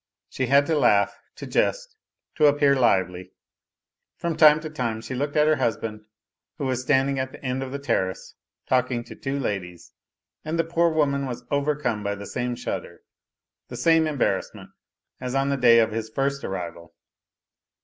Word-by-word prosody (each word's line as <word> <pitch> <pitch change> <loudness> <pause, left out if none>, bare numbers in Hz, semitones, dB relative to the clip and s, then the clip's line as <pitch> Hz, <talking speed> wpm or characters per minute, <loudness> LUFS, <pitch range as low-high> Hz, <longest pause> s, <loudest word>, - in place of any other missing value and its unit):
She 130 - -2
had 140 +3 +5
to 160 - 0
laugh, 100 -7 +3 0.2
to - - -8
jest, - - -1 0.4
to 150 - +4
appear 145 -1 +4
lively. 95 -7 +1 0.8
From 170 -1 -2
time 155 -1 +7
to 155 - -6
time 120 -7 -2
she 130 - -7
looked 145 +3 -3
at 150 0 +4
her 155 0 +3
husband, 110 -2 -2 0.5
who 145 - -3
was 130 -1 -1
standing 135 +1 +1
at 130 0 -3
the - - -13
end 130 +1 -1
of 130 -1 -5
the 140 - -3
terrace 95 -9 -2 0.3
talking 125 -2 +1
to 120 - -11
two 135 +1 -3
ladies, 95 -9 -5 0.5
and 155 +2 -3
the 165 - +2
poor 170 +1 +2
woman 140 -3 0
was 125 -1 -6
overcome 140 -6 0
by 100 0 -2
the 100 0 -8
same 125 +3 -3
shudder, - - -6 0.7
the 120 - -8
same 160 +4 +3
embarrassment, 145 -5 -2 0.5
as 125 0 -4
on 135 0 +1
the 140 - +1
day 120 -3 +6
of 110 -1 +3
his 110 0 -4
first 140 +4 -2
arrival. 85 -3 -6
130 Hz, 175 wpm, -24 LUFS, 115-145 Hz, 0.8 s, time